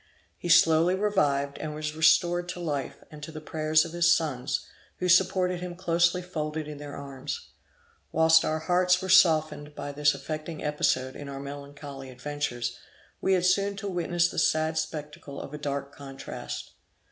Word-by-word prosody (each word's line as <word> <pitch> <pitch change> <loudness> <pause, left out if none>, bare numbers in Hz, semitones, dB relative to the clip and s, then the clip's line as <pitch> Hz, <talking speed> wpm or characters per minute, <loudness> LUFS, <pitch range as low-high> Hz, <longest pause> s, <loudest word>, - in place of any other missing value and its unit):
He 175 - -6
slowly 165 +1 +5
revived, 145 -9 +1
and 155 -1 -5
was 150 0 -4
restored 175 +2 +3
to 180 - -5
life, 145 -6 -4
and 150 -1 -11
to 150 - -7
the 155 - -7
prayers 155 0 +2
of 165 - -7
his 175 0 +3
sons, 135 -4 -2 0.3
who 180 - -1
supported 180 0 +3
him 180 -1 -6
closely 175 0 +1
folded 155 -3 -4
in 150 -1 -8
their 145 -1 -8
arms. 140 - -6 0.6
Whilst 160 0 +5
our 155 - 0
hearts 180 +1 +3
were 190 - -5
softened 155 -5 +4
by 145 - -5
this 145 +1 +2
affecting 155 0 -6
episode 130 -3 0
in 145 -1 -8
our 135 0 -6
melancholy 140 -1 -8
adventures, 125 -3 -4 0.4
we 190 - +2
had 180 -1 +2
soon 200 +2 +2
to 200 +1 -5
witness 175 -2 +1
the - - -3
sad 155 0 +2
spectacle 150 -3 -6
of 140 - -8
a 150 - -6
dark 140 -1 -4
contrast. 135 -1 -7
155 Hz, 170 wpm, -27 LUFS, 145-175 Hz, 0.6 s, slowly